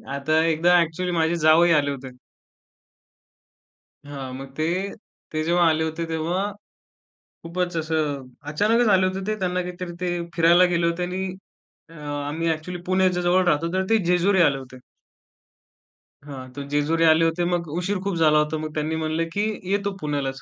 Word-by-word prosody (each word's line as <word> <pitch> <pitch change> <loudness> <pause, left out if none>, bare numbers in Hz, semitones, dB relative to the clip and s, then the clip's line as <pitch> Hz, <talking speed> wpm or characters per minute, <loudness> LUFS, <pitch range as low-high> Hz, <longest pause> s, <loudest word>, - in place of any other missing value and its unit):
आता 155 +3 0
एकदा 170 +2 +4
एक्चुअली 175 +2 -2
माझे 165 0 +1
जावई 165 +2 +6
आले 145 -1 -1
होते. 135 -1 -7 2.0
हां, 135 -3 -7
मग 135 +1 -9
ते 155 - -1 0.7
ते 155 - -1
जेव्हा 175 +2 +2
आले 160 0 +1
होते 160 +1 -3
तेव्हा 165 +4 -1 1.0
खूपच 175 +1 -3
असं, 155 -4 -2 0.2
अचानकच 220 +9 +2
आले 185 0 +4
होते 190 +1 -4
ते 215 - 0
त्यांना 180 -1 -1
काहीतरी 180 0 -6
ते 180 - -1 0.3
फिरायला 170 +2 +5
गेले 170 0 +2
होते 170 +1 -1
आणि 185 +2 -3 0.6
अ, - - -15
आम्ही 150 +1 -3
एक्चुअली 170 +3 -5
पुण्याच्या 185 -1 +2
जवळ 180 +1 +3
राहतो 165 +1 +1
तर 190 0 +1
ते 225 - +5
जेजुरी 180 +2 +3
आले 145 -5 +3
होते. 130 -1 -11 1.5
हां, 130 -2 -8
ते 140 +1 -6
जेजुरी 150 +3 +1
आले 160 +1 +4
होते 165 +2 0
मग 175 -1 -1
उशीर 195 +3 -1
खूप 200 -2 -1
झाला 155 -2 +4
होता. 150 +1 0
मग 155 0 -5
त्यांनी 155 +1 -2
म्हणलं, 155 +1 -1
"की 205 - 0 0.3
येतो 200 0 0
पुण्यालाच." 140 -3 -3
165 Hz, 160 wpm, -23 LUFS, 150-180 Hz, 2.0 s, जावई